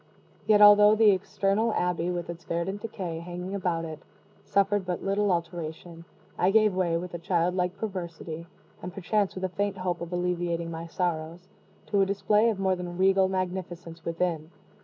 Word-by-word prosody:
Yet 210 -1 +6
although 210 +1 +8
the 215 -1 +6
external 200 +3 0
abbey, 180 -1 0
with 175 -1 -3
its 170 0 -8
verdant 190 +4 -3
decay 185 -7 -5
hanging 180 +2 -6
about 175 -4 -1
it, 155 -2 -8 0.4
suffered 200 0 +1
but 180 -1 -4
little 200 +1 +1
alteration, 170 -1 -4 0.3
I 180 - +4
gave 215 0 +4
way, 175 -3 +1
with 175 +1 -6
a 170 - -4
child 170 +1 +1
like 180 +1 -1
perversity, 170 -5 -6 0.3
and 180 - -6
perchance 200 +2 -1
with 190 - -6
a 185 - 0
faint 200 +2 -2
hope 180 -2 -2
of 170 0 -6
alleviating 175 -1 -1
my 165 +1 -6
sorrows, 170 0 -3 0.4
to 200 -2 +1
a 195 - +3
display 210 +3 +2
of 220 - -1
more 190 -1 +2
than 175 -1 -6
regal 190 0 +4
magnificence 180 -3 -4
within. 165 -2 -2
180 Hz, 175 wpm, -27 LUFS, 170-195 Hz, 0.4 s, although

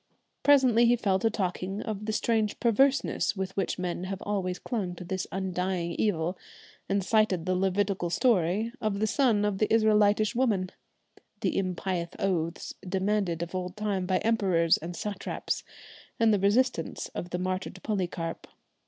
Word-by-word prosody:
Presently 255 -5 +5
he 240 - +5
fell 195 -5 +1
to 225 - +2
talking 195 -1 -3
of 215 -1 -5
the - - +1
strange 220 -1 0
perverseness 265 +1 +2
with 190 -1 -4
which 195 - -1
men 180 0 -3
have 190 0 -4
always 190 -3 -2
clung 195 -7 -3
to 180 - -8
this 190 +1 -3
undying 185 -2 -2
evil, 175 -2 -1 0.5
and 195 0 +1
cited 195 -4 +2
the 185 - +1
Levitical 190 -1 0
story 210 0 +2
of 215 -2 0
"the 215 - +2
son 220 -3 +2
of 200 -2 -1
the 215 - +1
Israelitish 215 -1 +4
woman," 210 -7 +1 0.7
the - - 0
impious 180 -2 -1
oaths 175 -5 -2
demanded 190 -2 0
of 170 - -8
old 180 +1 -4
time 200 -3 -1
by 185 0 +2
emperors 185 -7 +3
and 170 +2 -7
satraps, 200 +1 -3 0.6
and 225 -1 +5
the 205 - +2
resistance 205 -1 +1
of 175 - -5
the 180 - -2
martyred 185 0 -3
Polycarp. 175 -5 -3
195 Hz, 155 wpm, -28 LUFS, 180-215 Hz, 0.7 s, Presently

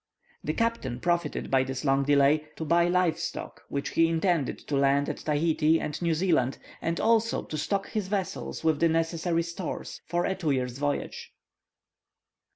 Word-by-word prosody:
The 155 - -1
captain 230 - -1
profited 170 0 -1
by 135 -1 +4
this 130 +1 -4
long 135 0 +3
delay, 145 +2 +4
to 160 - -5
buy 170 +2 +3
live 180 -2 +2
stock, - - -5
which 140 0 -2
he 165 - +3
intended 165 -3 +1
to 145 - -3
land 140 +1 +3
at - - -3
Tahiti 155 +1 +2
and 150 +2 -4
New 170 -2 +1
Zealand, 155 -7 +1 0.2
and 165 +1 -1
also 230 0 +2
to - - -6
stock 195 +6 -1
his 210 -4 -2
vessels 195 -4 -3
with 160 -2 +2
the 165 - +4
necessary 165 +1 0
stores 170 0 -6
for 175 +1 0
a - - +1
two 185 -5 -2
years' 130 -2 -1
voyage. 145 0 -3
160 Hz, 170 wpm, -28 LUFS, 145-175 Hz, 0.2 s, by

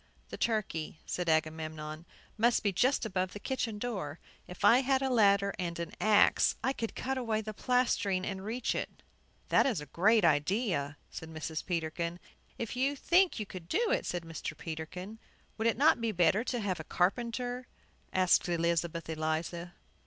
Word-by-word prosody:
"The - - -6
turkey," 200 -9 -1
said 180 -2 -2
Agamemnon, 155 0 -2 0.3
"must 235 +2 +3
be 200 -2 +1
just 250 +6 +2
above 185 -3 -1
the 205 - -7
kitchen 230 -3 -2
door. 195 -10 -4 0.3
If 180 +2 -4
I 230 +5 +7
had 270 0 +2
a 265 - 0
ladder 200 -4 +4
and 170 -2 -3
an 170 -1 -5
axe, 210 -1 +4
I 265 +3 +1
could 225 -4 -4
cut 265 0 -2
away 225 -3 0
the 215 0 -6
plastering 220 -6 +1
and 190 -1 -4
reach 230 +4 -1
it." - - -5 0.5
"That - - +4
is 230 - 0
a 150 - -7
great 200 +8 +3
idea," 150 - +1
said 160 - -8
Mrs. 160 0 -4
Peterkin. 170 0 -2 0.4
"If 230 0 -4
you 270 +3 +1
think 350 +2 +3
you 215 - -2
could 185 -4 -9
do 455 +5 +1
it," - - 0
said 175 -1 -2
Mr. 165 -1 -6
Peterkin. 180 +6 -6 0.4
"Would 225 - +2
it 230 - +2
not 295 -2 +4
be 230 -1 0
better 180 +3 +3
to 245 - -1
have 190 -5 -2
a - - -5
carpenter?" 245 +8 -1 0.4
asked 185 -1 +3
Elizabeth 170 0 0
Eliza. 160 +2 -3
195 Hz, 175 wpm, -31 LUFS, 165-235 Hz, 0.5 s, I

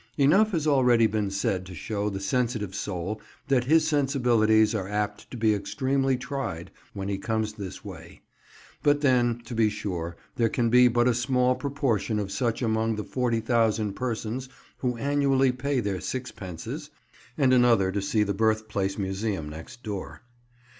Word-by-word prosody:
Enough 185 +10 +5
has 160 -3 0
already 125 -6 +4
been 105 -2 0
said 100 -1 -1
to 90 - -9
show 105 +2 -2
the 95 -1 -4
sensitive 110 -1 -1
soul 100 +2 -4 0.3
that 130 -3 +3
his 155 +3 +4
sensibilities 120 -7 +3
are 100 -4 -2
apt 105 0 -3
to 125 - -7
be 110 -1 +3
extremely 135 +5 0
tried 125 -10 -5 0.2
when 95 0 -5
he 100 -1 -2
comes 110 0 -1
this 100 -2 -8
way; 85 -4 -11 0.6
but 145 0 +3
then, 120 -4 +3
to 120 - -7
be 110 -2 +3
sure, 85 -5 -4 0.2
there 115 -1 +3
can 115 0 0
be 125 +1 +7
but 120 0 +2
a 125 - +4
small 125 +1 +2
proportion 130 -6 -1
of 100 -2 -3
such 115 +4 -1
among 110 0 +1
the 105 - -4
40,000 115 -4 0
persons 125 +2 -3 0.3
who 125 -2 -1
annually 135 -1 +2
pay 130 +2 -1
their 100 -5 -2
sixpences 105 -9 -6 0.5
(and 135 -4 +4
another 115 -7 +4
to 100 +1 -1
see 105 +2 +1
the 100 -1 -1
Birthplace 110 -2 0
Museum 95 -4 -2
next 80 +10 -10
door). 100 -1 -6
115 Hz, 160 wpm, -26 LUFS, 100-125 Hz, 0.6 s, be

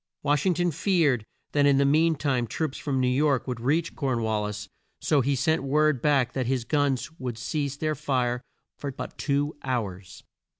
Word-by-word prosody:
Wash 145 +3 +2
ing 180 - +3
ton 175 0 +1
feared 150 - +1 0.2
that 145 -1 +3
in 140 -1 +5
the 140 - +4
mean 160 +3 +4
time 130 -5 0
troops 155 +3 -3
from 135 -3 -1
New 130 - +2
York 135 +1 +2
would 125 -2 -3
reach 150 +8 0
Corn 130 -5 -1
wal 110 -1 0
lis, 105 0 -5 0.3
so 145 -3 +2
he 140 +2 +1
sent 160 +5 +1
word 150 -1 +2
back 135 -4 +2
that 130 -3 -1
his 125 -2 0
guns 145 +1 0
should 120 -3 -3
cease 140 +3 -2
their 155 +1 0
fire 130 -4 -1 0.4
for 140 - -4
but 130 - -7
two 145 +1 0
hours. 100 -8 -4
140 Hz, 195 wpm, -26 LUFS, 125-150 Hz, 0.4 s, in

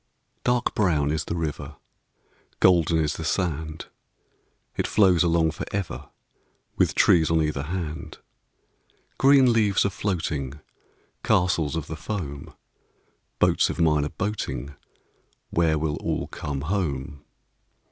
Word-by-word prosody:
Dark 125 -1 +1
brown 75 -8 +1
is 80 -1 -2
the - - -3
river, 75 -2 -4 0.8
Golden 85 -3 +4
is 75 -1 0
the 80 - -5
sand. 80 -2 -2 0.9
It - - -1
flows 95 -5 +4
along 85 -2 +3
for - - -6
ever, 100 -3 -4 0.7
With - - +1
trees 80 -2 +4
on 80 0 +3
either 75 -3 -1
hand. 80 0 -5 1.0
Green 135 -3 +6
leaves 105 -4 +2
a 100 - +1
floating, 80 -10 -2 0.7
Castles 85 -4 +1
of 80 -3 -3
the 80 - -6
foam, 75 -6 -6 0.8
Boats - - +3
of - - -5
mine 75 -3 +3
a 75 - -2
boating— 85 - -4 0.8
Where 80 -2 +2
will 75 -1 -1
all - - -2
come 70 -2 -5
home? 75 -5 -3
80 Hz, 125 wpm, -25 LUFS, 75-90 Hz, 1.0 s, Green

